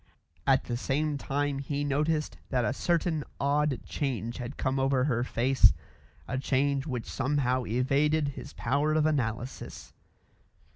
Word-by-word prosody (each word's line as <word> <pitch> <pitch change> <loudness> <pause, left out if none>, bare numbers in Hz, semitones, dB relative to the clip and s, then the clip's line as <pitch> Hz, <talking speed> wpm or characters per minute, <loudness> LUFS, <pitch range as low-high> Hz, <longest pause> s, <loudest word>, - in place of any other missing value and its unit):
At 135 -1 +4
the 120 - -3
same 145 +3 0
time 140 0 -1
he 145 +1 -2
noticed 150 +2 0
that 125 -3 +1
a 110 - +1
certain 165 0 0 0.2
odd 145 -1 +1
change 120 -5 -3
had 125 +2 -6
come 135 0 0
over 135 -1 +2
her 120 -4 +1
face, 130 +2 +4 0.5
a 130 - -2
change 140 +1 +1
which 125 -5 -3
somehow 130 -2 0
evaded 140 +5 +2
his 140 0 -8
power 145 +5 +1
of 155 -1 +3
analysis. 125 -5 -2
135 Hz, 140 wpm, -29 LUFS, 130-145 Hz, 0.5 s, At